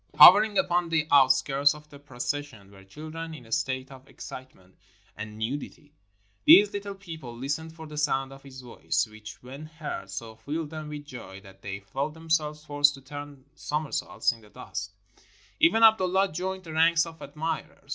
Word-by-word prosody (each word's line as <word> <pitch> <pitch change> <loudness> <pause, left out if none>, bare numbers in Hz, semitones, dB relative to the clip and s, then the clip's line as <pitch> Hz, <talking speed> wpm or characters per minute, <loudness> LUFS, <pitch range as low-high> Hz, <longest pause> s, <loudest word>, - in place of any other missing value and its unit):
Hovering 210 0 +9
upon 175 -1 +2
the 160 -2 +1
out 135 -2 +7
skirts 140 +2 +3
of 150 0 -14
the 140 - -12
procession 130 -5 -5
were 95 -1 -15
children 160 +9 -8
in 125 -6 -12
a 115 - -17
state 130 +1 -1
of 135 0 -13
ex - - -12
citement 95 -8 -11 0.4
and 105 0 -7
nudity. 140 +5 -5 0.5
These 205 +1 +8
little 200 0 -5
people 160 -11 -9
listened 155 +5 -4
for 160 -1 -9
the 150 -1 -6
sound 135 -2 0
of 135 - -13
his 130 -1 -11
voice, 120 -2 -1
which, 110 +1 -12
when 135 +5 -9
heard, 155 -10 -6
so 110 +3 -7
filled 150 +6 -4
them 155 -1 -6
with 150 -1 -7
joy 120 -8 -9
that 95 -1 -16
they 100 0 -6
felt 135 +10 -4
themselves 155 -2 -1
forced 145 -1 +3
to 135 - -13
turn 145 -1 -9
somer 150 0 -3
saults - - 0
in 115 -2 -12
the 105 - -18
dust. 105 0 -6 0.7
Even 225 +7 +5
Abdullah 195 -3 +5
joined 185 +3 -4
the 160 -3 -8
ranks 165 +1 +4
of 165 -1 -11
admirers. 155 +3 -5
145 Hz, 185 wpm, -27 LUFS, 125-160 Hz, 0.7 s, Hovering